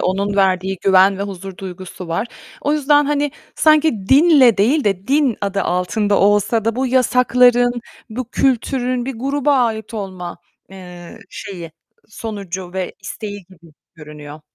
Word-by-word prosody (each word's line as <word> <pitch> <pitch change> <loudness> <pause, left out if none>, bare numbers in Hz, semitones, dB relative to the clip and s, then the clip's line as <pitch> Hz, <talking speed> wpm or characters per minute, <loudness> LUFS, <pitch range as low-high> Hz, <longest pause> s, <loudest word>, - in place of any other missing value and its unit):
onun 200 +2 -1
verdiği 190 -1 +1
güven 190 0 +4
ve - - -2
huzur 195 -1 -7
duygusu 185 -1 -9
var. 170 +7 -2 0.3
O 290 - 0
yüzden, 295 0 +3
hani, 290 -1 0 0.2
sanki 305 -10 +2
dinle 280 -5 +6
değil 255 +8 +2
de 195 -2 -1
din 275 -5 +2
adı 200 -1 -2
altında 200 +4 0
olsa 205 +2 +2
da 230 0 -1
bu 260 +1 0
yasakların, 245 -1 +3 0.3
bu 245 +1 -5
kültürün 255 -1 0
bir 270 - -4
gruba 280 +3 0
ait 225 -2 -1
olma, 185 -5 -6 0.3
eee, 180 -2 -11
şeyi, 170 -5 -8 0.4
sonucu 195 -5 -7
ve 190 -1 -4
isteği 205 0 -7
gibi 170 -4 -19 0.2
görünüyor. 150 -1 -11
205 Hz, 140 wpm, -18 LUFS, 185-250 Hz, 0.4 s, dinle